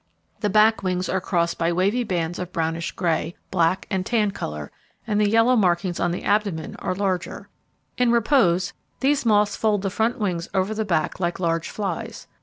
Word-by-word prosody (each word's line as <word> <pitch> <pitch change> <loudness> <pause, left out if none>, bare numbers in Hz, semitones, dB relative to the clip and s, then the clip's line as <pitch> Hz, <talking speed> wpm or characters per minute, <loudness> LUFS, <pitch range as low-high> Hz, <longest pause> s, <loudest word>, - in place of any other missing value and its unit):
The 210 - 0
back 215 +2 +4
wings 185 -1 -1
are 190 - 0
crossed 170 -2 0
by 165 +1 +1
wavy 200 +8 +1
bands 175 -5 -2
of 180 0 -5
brownish 165 -1 -2
grey, 170 -1 -1 0.2
black, 180 +1 +1
and 190 -2 0
tan 210 -1 +1
colour, 75 - -6 0.3
and 210 -2 +1
the 205 - +3
yellow 230 +3 +4
markings 180 -4 +1
on - - +1
the 175 - -4
abdomen 200 -7 0
are 185 - -3
larger. 185 -3 -2 0.5
In 250 -1 +4
repose, 215 -7 +3 0.3
these 275 -2 +2
moths 210 -2 +3
fold 210 -3 +1
the 195 - -1
front 225 +4 0
wings 180 -6 -2
over 190 +3 +1
the 220 0 -2
back 170 -4 -1
like 175 0 -1
large 165 -2 -1
flies. 195 -5 -4
190 Hz, 185 wpm, -23 LUFS, 170-215 Hz, 0.5 s, back